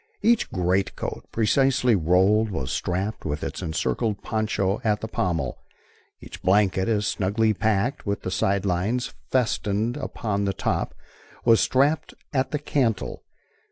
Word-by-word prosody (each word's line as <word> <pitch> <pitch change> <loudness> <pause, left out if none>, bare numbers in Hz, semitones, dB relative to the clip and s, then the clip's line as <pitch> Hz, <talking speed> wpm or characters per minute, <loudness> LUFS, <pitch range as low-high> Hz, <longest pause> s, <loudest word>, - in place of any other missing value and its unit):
Each 235 0 +3
greatcoat, 90 +2 -1
precisely 125 +1 +3
rolled, 95 +6 +3
was 70 -10 -3
strapped 95 +5 -2
with 75 -1 -3
its - - -4
encircling 105 +7 -1
poncho 105 -1 -1
at 105 -2 +1
the 110 - -5
pommel. 85 - -2 0.6
Each - - -11
blanket, 95 -1 +3
as 105 -2 +1
snugly 110 +4 +1
packed, 110 +5 0
with 100 -1 -2
the 95 - -3
sidelines 100 +5 0 0.2
festooned 115 -1 0
upon 105 -7 -2
the 100 - 0
top, - - -2 0.5
was 115 -1 +6
strapped 140 +4 +1 0.2
at 130 -1 +1
the 150 - -1
cantle. 130 -7 -1
105 Hz, 130 wpm, -25 LUFS, 95-115 Hz, 0.6 s, was